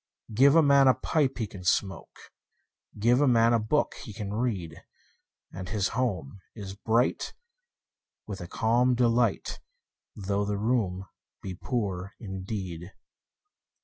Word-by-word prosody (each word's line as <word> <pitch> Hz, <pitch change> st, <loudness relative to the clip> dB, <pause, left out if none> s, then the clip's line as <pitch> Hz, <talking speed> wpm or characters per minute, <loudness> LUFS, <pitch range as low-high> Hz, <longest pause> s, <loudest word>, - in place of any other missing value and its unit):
Give 140 Hz, +7 st, +5 dB
a 165 Hz, -, +7 dB
man 140 Hz, -1 st, +5 dB
a 130 Hz, -, +6 dB
pipe 145 Hz, -4 st, 0 dB
he 115 Hz, -, -1 dB
can 95 Hz, -3 st, -10 dB
smoke, 95 Hz, 0 st, -2 dB, 0.6 s
5 105 Hz, -, -11 dB
Give 120 Hz, +4 st, +4 dB
a 145 Hz, -, +4 dB
man 115 Hz, -1 st, +4 dB
a 115 Hz, -, +3 dB
book 110 Hz, +8 st, 0 dB
he 115 Hz, -6 st, -9 dB
can 100 Hz, -1 st, -5 dB
read: 100 Hz, -9 st, -3 dB, 0.7 s
And 90 Hz, 0 st, -7 dB
his 105 Hz, -4 st, 0 dB
home 100 Hz, -, -2 dB, 0.2 s
is 100 Hz, -3 st, -7 dB
bright 115 Hz, +5 st, 0 dB, 0.9 s
with 100 Hz, -4 st, -7 dB
a 85 Hz, -, -6 dB
calm 120 Hz, +5 st, +2 dB
delight, 120 Hz, -2 st, +1 dB, 0.6 s
Though 100 Hz, 0 st, -1 dB
the 100 Hz, 0 st, -2 dB
room 100 Hz, -4 st, 0 dB, 0.4 s
be 95 Hz, -, -5 dB
poor 95 Hz, -3 st, -3 dB
indeed. 95 Hz, -3 st, -6 dB
105 Hz, 140 wpm, -28 LUFS, 95-120 Hz, 0.9 s, a